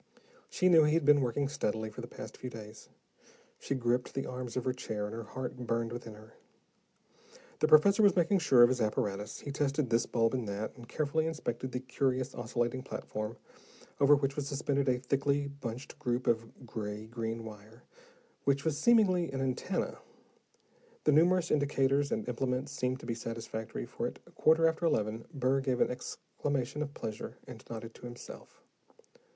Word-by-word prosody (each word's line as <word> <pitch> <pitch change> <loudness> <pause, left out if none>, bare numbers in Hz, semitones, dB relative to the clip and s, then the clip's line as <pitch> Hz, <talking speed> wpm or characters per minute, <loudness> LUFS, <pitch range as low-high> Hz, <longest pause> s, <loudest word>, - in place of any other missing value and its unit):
She 185 - +2
knew 165 -3 +7
he 150 +1 +3
had 165 - +2
been 145 0 +6
working 135 +3 0
steadily 110 -6 -2
for 115 - -7
the 120 - -7
past - - -9
few 125 - -6
days. 110 -2 -10 0.7
She 135 - -2
gripped 125 0 0
the 135 - -1
arms 125 -1 -5
of 125 - -1
her 130 - +1
chair, 105 -4 -3
and 105 - -5
her 115 - -4
heart 130 +3 -5
burned 115 -2 -2
within 115 -3 -7
her. 110 +1 -15 1.3
The 155 - +3
professor 195 +8 +6
was 205 -2 +6
making 180 +2 +3
sure 130 -7 +6
of 120 - +7
his 125 -1 0
apparatus. 105 -1 -1
He 140 - -5
tested 140 -2 0
this 115 +1 +3
bulb 115 0 +2
and 125 -4 -1
that, 100 +2 -4
and 120 -2 -13
carefully 155 +1 0
inspected 130 -5 -3
the 125 - -3
curious 130 0 0
oscillating 120 +1 -1
platform, 110 -4 -5 0.6
over 145 +1 +7
which 140 -1 0
was 145 -2 -2
suspended 140 -1 0
a 125 - +3
thickly 140 +3 +1
bunched 140 -1 -7
group 125 -3 -1
of 115 +2 -1
gray 105 -2 -5
green 115 0 -4
wire, 110 +2 -11 0.6
which 140 +1 +1
was 155 -2 0
seemingly 185 - +4
an 135 - -3
antenna. 130 -1 -1 1.0
The 150 - +4
numerous 175 +3 +4
indicators 140 -1 +2
and 110 - -1
implements 125 +2 -1
seemed 130 -1 -1
to - - -9
be 120 - -1
satisfactory, 115 -1 -5
for - - -3
at - - -7 0.2
quarter 165 +1 +5
after 160 +1 -1
eleven 110 -3 0
Burr 135 -2 +1
gave 130 -2 0
an - - +3
exclamation 135 +2 -3
of 145 -1 -4
pleasure 110 -2 -5
and - - -10
nodded 115 0 -6
to 125 - -9
himself. 120 0 -11
130 Hz, 180 wpm, -32 LUFS, 115-145 Hz, 1.3 s, knew